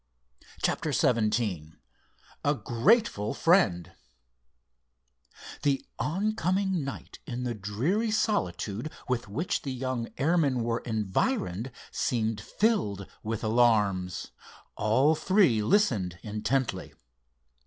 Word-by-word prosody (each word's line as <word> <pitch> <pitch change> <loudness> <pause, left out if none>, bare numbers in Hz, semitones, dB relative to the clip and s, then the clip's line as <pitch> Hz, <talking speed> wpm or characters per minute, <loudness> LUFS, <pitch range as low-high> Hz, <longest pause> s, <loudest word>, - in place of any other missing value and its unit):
CHAPTER - - 0
XVII 105 -9 +1 0.7
A 145 +1 +2
GRATEFUL 135 - +2
FRIEND 95 - +3 1.7
The 140 -2 +1
oncoming 190 -1 0
night 135 - -7
in 125 0 -4
the 120 -1 -1
dreary 120 - -1
solitude 120 - -1 0.2
with 125 -3 -1
which 140 - -2
the 135 - -4
young 130 -2 -3
airmen 140 -5 +2
were 115 0 0
environed 110 - -1 0.2
seemed 110 -3 -1
filled 105 - 0 0.2
with 110 0 -4
alarms. 105 -6 +2 0.4
All 130 +8 +3
three 170 - +3
listened 105 - +2
intently. 115 +5 -2
120 Hz, 90 wpm, -28 LUFS, 105-165 Hz, 1.7 s, FRIEND